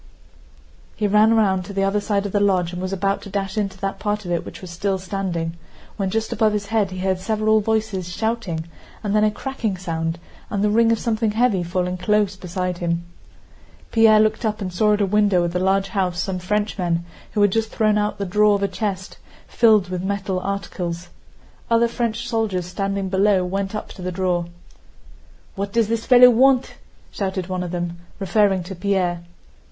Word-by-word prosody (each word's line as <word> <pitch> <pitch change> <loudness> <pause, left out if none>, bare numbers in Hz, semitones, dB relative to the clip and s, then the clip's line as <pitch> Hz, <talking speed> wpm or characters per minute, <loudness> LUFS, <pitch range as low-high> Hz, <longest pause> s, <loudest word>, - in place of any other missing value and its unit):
He 215 - -1
ran 210 +2 +5
round 190 -4 +2
to 200 - -8
the 195 0 0
other 195 +1 +1
side 205 -1 0
of 200 - -3
the 205 - +1
lodge 185 -3 +2
and 180 - -5
was 185 0 -3
about 195 +1 0
to - - -9
dash 195 -1 -3
into 200 -3 -2
that 195 0 -3
part 210 0 -2
of 175 - -4
it 170 -1 0
which - - -9
was 185 -2 -9
still 190 +3 -1
standing, 185 -3 -3 0.4
when 195 -2 -1
just 220 +3 -1
above 215 -1 +2
his 205 -1 -2
head 210 -2 +1
he 185 - -7
heard 185 0 0
several 215 +2 +2
voices 215 -4 -1
shouting 205 -6 -2 0.4
and 205 0 0
then 210 - +4
a 215 - +4
cracking 220 -3 -3
sound 165 -2 -3 0.3
and 200 -1 -1
the 210 - +2
ring 230 +1 +4
of 230 - +3
something 225 -1 0
heavy 225 -4 +2
falling 180 +1 -2
close 205 +1 +1
beside 180 -1 -4
him. 170 0 -1 0.9
Pierre 225 -1 +6
looked 215 +1 +2
up 215 -1 -1
and 185 -3 -4
saw 210 +3 +3
at 205 - -2
a - - +4
window 200 -2 +3
of 170 0 -2
the 180 - 0
large 195 +1 +1
house 180 -2 -1
some 185 0 -2
Frenchmen 180 -3 -1 0.3
who 210 - +1
had 205 - +4
just 225 +1 0
thrown 215 -1 +2
out 210 0 -1
the 200 - -3
drawer 210 +2 +3
of 200 - -2
a - - +3
chest, 190 -1 -4 0.3
filled 215 -5 +4
with 180 -1 -3
metal 195 -1 -2
articles. 180 -3 -4 0.6
Other 230 0 +4
French 235 0 -2
soldiers 215 -6 -1
standing 195 +2 -2
below 190 -1 +3
went 195 +2 -3
up 210 - -5
to 190 - -11
the 180 0 -3
drawer. 180 -1 0 1.1
"What 200 0 -4
does 225 0 +1
this 230 0 -1
fellow 250 -1 +8
want?" 260 +2 +3 0.4
shouted 190 -2 -3
one 185 0 -3
of 180 - -4
them 175 -1 -4 0.2
referring 195 -1 +2
to 185 +3 -7
Pierre. 180 -2 0
195 Hz, 200 wpm, -22 LUFS, 185-215 Hz, 1.1 s, fellow